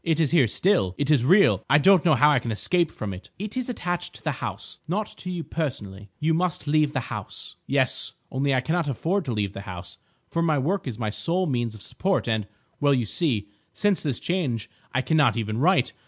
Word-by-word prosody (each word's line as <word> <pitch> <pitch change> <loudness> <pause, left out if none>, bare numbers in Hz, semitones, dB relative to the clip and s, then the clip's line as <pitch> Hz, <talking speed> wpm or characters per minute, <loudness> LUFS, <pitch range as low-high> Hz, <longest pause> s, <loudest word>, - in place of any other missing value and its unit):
It 165 -1 +1
is 155 -4 +2
here 150 -8 +5
still. 110 - +1
It 145 +1 +1
is 140 -6 +4
real. 190 +9 +5
I 145 - +6
don't 185 +3 +5
know 160 -4 +4
how 145 +4 +5
I 145 - +4
can 115 - -4
escape 170 +10 +2
from 105 -8 -5
it." 90 - -10
"It 210 +4 -5
is 255 -1 -2
attached 175 -7 -3
to - - -14
the - - 0
house, - - -5
not 205 +6 -1
to 180 - -6
you 175 -2 -3
personally. 105 -12 -5
You 160 +1 +2
must 170 -1 -1
leave 150 0 +2
the 135 - 0
house." - - -7
"Yes. - - 0 0.2
Only 135 +2 0
I 130 - +2
cannot 165 +3 0
afford 170 - -1
to 130 - -2
leave 105 -3 -2
the 100 - -6
house, 90 -1 -8 0.3
for 165 - 0
my 160 -3 +2
work 165 +6 -1
is 120 -4 -4
my 110 -3 -2
sole 175 - 0
means 120 -7 -1
of 105 - -8
support, 190 -6 -1
and—well, 110 +6 -1
you 125 -3 0
see, 110 - 0 0.3
since 205 -3 +1
this 140 -6 -2
change 140 - -2 0.2
I 130 - 0
cannot 145 -9 +3
even 110 0 -2
write. 180 +7 +3
145 Hz, 220 wpm, -25 LUFS, 115-175 Hz, 0.3 s, I